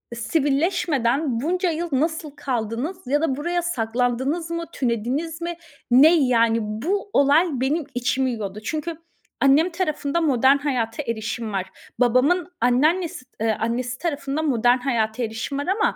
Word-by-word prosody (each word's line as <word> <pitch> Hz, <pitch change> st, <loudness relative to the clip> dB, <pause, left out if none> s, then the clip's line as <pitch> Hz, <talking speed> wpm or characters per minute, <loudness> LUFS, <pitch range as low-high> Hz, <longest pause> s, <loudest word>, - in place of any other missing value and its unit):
sivilleşmeden 275 Hz, -, 0 dB
bunca 360 Hz, +5 st, 0 dB
yıl 335 Hz, +2 st, -3 dB
nasıl 315 Hz, +2 st, -1 dB
kaldınız 265 Hz, -, -3 dB
ya 290 Hz, +3 st, +1 dB
da 305 Hz, -5 st, +1 dB
buraya 345 Hz, +4 st, -1 dB
saklandınız 255 Hz, +3 st, -1 dB
mı? 335 Hz, 0 st, -3 dB
Tünediniz 265 Hz, +7 st, -2 dB
mi? 340 Hz, 0 st, -3 dB, 0.4 s
Ne, 295 Hz, +7 st, +7 dB
yani, 230 Hz, -2 st, +3 dB
bu 305 Hz, -, -2 dB
olay 285 Hz, +5 st, +4 dB
benim 275 Hz, +5 st, 0 dB
içimi 260 Hz, +2 st, 0 dB
yiyordu. 210 Hz, -3 st, -5 dB
Çünkü 310 Hz, +6 st, -3 dB, 0.5 s
annem 285 Hz, +6 st, +5 dB
tarafında 335 Hz, -3 st, -1 dB
modern 270 Hz, -2 st, +4 dB
hayata 255 Hz, -3 st, -2 dB
erişim 230 Hz, -1 st, -3 dB
var. 190 Hz, -1 st, -1 dB, 0.3 s
Babamın 280 Hz, +9 st, +2 dB
anneannesi 300 Hz, +5 st, +1 dB, 0.2 s
eee, 220 Hz, -1 st, +1 dB
annesi 245 Hz, +2 st, -2 dB
tarafında 290 Hz, -3 st, -2 dB
modern 245 Hz, -4 st, +3 dB
hayata 235 Hz, -3 st, -1 dB
erişim 225 Hz, +5 st, -4 dB
var 285 Hz, -, -3 dB
ama 400 Hz, +4 st, +1 dB
275 Hz, 135 wpm, -23 LUFS, 235-325 Hz, 0.5 s, Ne